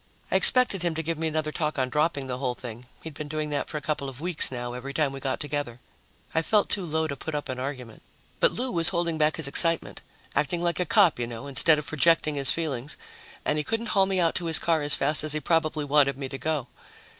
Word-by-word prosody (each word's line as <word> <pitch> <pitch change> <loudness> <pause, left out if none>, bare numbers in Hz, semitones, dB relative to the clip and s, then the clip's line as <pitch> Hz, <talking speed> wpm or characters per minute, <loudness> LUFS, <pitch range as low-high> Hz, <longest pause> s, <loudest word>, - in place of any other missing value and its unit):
I - - +1
expected 250 -7 +6
him 170 -2 -1
to 160 - -3
give 165 0 -3
me 165 - -1
another 155 -1 -2
talk 155 -1 -3
on 130 -1 0
dropping 150 -2 0
the 125 -1 -5
whole 125 -2 -2
thing; 120 0 -10 0.2
he'd 160 - -8
been 150 +1 -7
doing 155 0 -4
that 145 - -2
for 155 - -4
a - - -5
couple 150 -3 -3
of 130 -1 -11
weeks 170 0 +3
now, 120 -1 -5
every 135 +3 -7
time 150 -2 +1
we 135 - -7
got 135 -1 -3
together. 145 -5 -4 0.5
I 160 - +2
felt 205 +5 +1
too 190 -4 -1
low 160 0 -1
to 145 -3 -4
put 155 +3 -6
up 145 -1 -4
an 130 -1 -4
argument. 130 -4 -6 0.4
But - - +4
Lou 255 +2 -3
was 165 -2 +2
holding 170 -2 -2
back 150 0 +2
his 160 -4 +1
excitement 165 +3 +2 0.3
acting 170 +4 0
like 170 -1 0
a 180 - -1
cop, 190 - +4
you 120 - -2
know, 120 +3 -8
instead 140 +3 +4
of 150 - -5
projecting 155 +1 +2
his 140 -2 +3
feelings 150 -4 0 0.5
and 150 - 0
he - - -1
couldn't 225 +5 -3
haul 195 -1 +3
me 190 -1 -1
out 165 -2 +2
to - - -6
his 165 - +3
car 165 -2 +1
as 145 0 +1
fast 150 0 +1
as 155 -1 0
he 155 - 0
probably 155 -2 0
wanted 140 -2 +2
me 135 -1 -5
to 135 - -6
go. 155 -5 -2
150 Hz, 255 wpm, -26 LUFS, 140-165 Hz, 0.5 s, expected